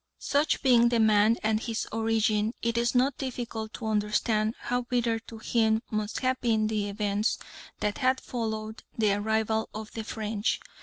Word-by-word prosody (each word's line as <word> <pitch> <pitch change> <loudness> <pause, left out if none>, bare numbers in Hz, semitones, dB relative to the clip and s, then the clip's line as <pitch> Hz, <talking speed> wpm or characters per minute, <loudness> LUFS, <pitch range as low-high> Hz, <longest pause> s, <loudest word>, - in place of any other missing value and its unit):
Such 290 +2 +1
being 240 -3 +6
the 235 -1 +2
man 220 +1 +5
and 215 0 +2
his 225 -1 -3
origin, 220 0 +1
it 230 0 0
is 235 +1 +1
not 255 +2 +2
difficult 235 -4 -4
to 235 - -6
understand 215 +1 +1
how 245 0 -1
bitter 240 -2 0
to 225 0 -11
him 220 0 +1
must 215 0 -2
have 255 0 0
been 220 -3 +2
the 210 -1 -1
events 205 +1 0 0.4
that 210 +4 -1
had 260 -1 +2
followed 220 -2 -4 0.2
the 215 -3 +3
arrival 220 +1 0
of 215 0 -6
the 225 - -5
French. 215 0 -2
220 Hz, 165 wpm, -28 LUFS, 215-235 Hz, 0.4 s, being